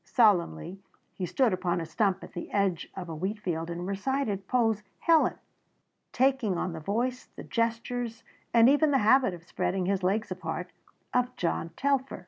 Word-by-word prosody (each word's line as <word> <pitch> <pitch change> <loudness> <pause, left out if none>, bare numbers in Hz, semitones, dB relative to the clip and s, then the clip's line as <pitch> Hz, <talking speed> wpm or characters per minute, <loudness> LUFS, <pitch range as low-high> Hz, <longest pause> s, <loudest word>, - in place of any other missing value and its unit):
Solemnly 190 - +2 0.3
he 185 - -4
stood 245 +2 +2
upon 175 -1 0
a 165 - -3
stump 195 +4 0
at - - -11
the 175 - -6
edge 195 -4 0
of 185 -2 -6
a 165 - -5
wheatfield 180 -2 -3
and 175 +1 -4
recited 200 0 -2
Poe's 225 -4 +2 0.2
"Helen," 330 -2 +3 0.8
taking 255 -7 +2
on 180 0 -2
the 160 - -5
voice, 235 +9 -2
the - - -8
gestures 230 0 -2 0.3
and 230 0 +6
even 290 +3 +5
the 280 - +4
habit 250 -4 +5
of 165 - -14
spreading 180 +1 -1
his 195 +1 0
legs 195 +3 0
apart, 180 0 -4 0.4
of 250 0 +1
John 165 -1 -1
Telfer. 275 -1 0
200 Hz, 165 wpm, -28 LUFS, 180-245 Hz, 0.8 s, and